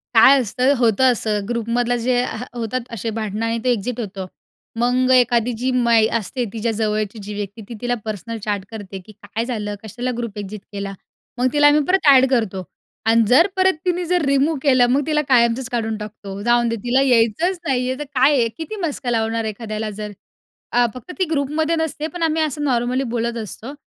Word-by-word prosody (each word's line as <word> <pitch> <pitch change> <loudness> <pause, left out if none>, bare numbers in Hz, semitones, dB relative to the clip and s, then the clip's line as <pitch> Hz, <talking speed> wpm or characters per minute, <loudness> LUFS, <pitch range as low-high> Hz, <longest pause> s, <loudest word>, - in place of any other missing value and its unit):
काय 265 +5 +8
असतं, 255 +5 +1
होतं 240 +2 +4
असं 210 -3 -1
ग्रुपमधलं 240 +1 0
जे 245 0 +2
ह 225 0 -4
होतात 240 +1 -3
अशे 230 0 -4
भांडणं 215 0 -2
आणि 230 0 0
ते 250 - +2
एक्झिट 245 +2 -2
होतो. 195 -3 -5 0.5
मग 250 +2 +2
एखादी 245 -2 +3
जी 255 +2 -1
मा 235 -2 +3
ई 220 0 +5
असते 235 +4 -3
तिच्या 230 0 -1
जवळची 215 0 -2
जी 210 +1 -6
व्यक्ती, 205 +2 -6
ती 235 - -6
तिला 245 0 0
पर्सनल 220 +2 -5
चॅट 205 -2 -2
करते 200 -3 -7
की 215 - -13
काय 215 +3 -5
झालं? 210 -4 -3
कशाला 245 +4 -4
ग्रुप 235 -3 -5
एक्झिट 205 0 -7
केला? 200 -1 -5 0.4
मग 250 +1 +2
तिला 290 0 +5
आम्ही 295 +1 +5
परत 370 -4 +2
ॲड 265 -2 +8
करतो 220 -7 0 0.4
आणि 230 +1 +4
जर 315 - +6
परत 380 0 +4
तिने 360 0 0
जर 355 0 +1
रिमूव्ह 280 +3 +2
केलं, 255 -4 +5
मग 275 +3 +2
तिला 300 -1 +2
कायमचंच 235 0 +3
काढून 225 -2 -2
टाकतो, 205 -2 -8
जाऊन 240 0 +3
दे 230 - -1
तिला 245 +2 +2
यायचंच 270 - +2
नाही 250 -2 +1
आहे 260 - -2
तर - - -2
काय 265 +3 +5
आहे, 230 -2 +3
किती 375 +7 -5
मस्का 265 -5 -3
लावणार 225 0 0
एखाद्याला? 215 0 -4
जर 210 0 -6 0.6
अ, 245 0 +4
फक्त 255 +8 -10
ती 370 - +3
ग्रुपमध्ये 310 +2 0
नसते 320 -1 -2
पण 345 -2 -3
आम्ही 320 0 +1
असं 300 -1 -1
नॉर्मली 250 -1 +1
बोलत 235 0 -1
असतो 230 +6 -8
240 Hz, 200 wpm, -20 LUFS, 220-265 Hz, 0.6 s, काय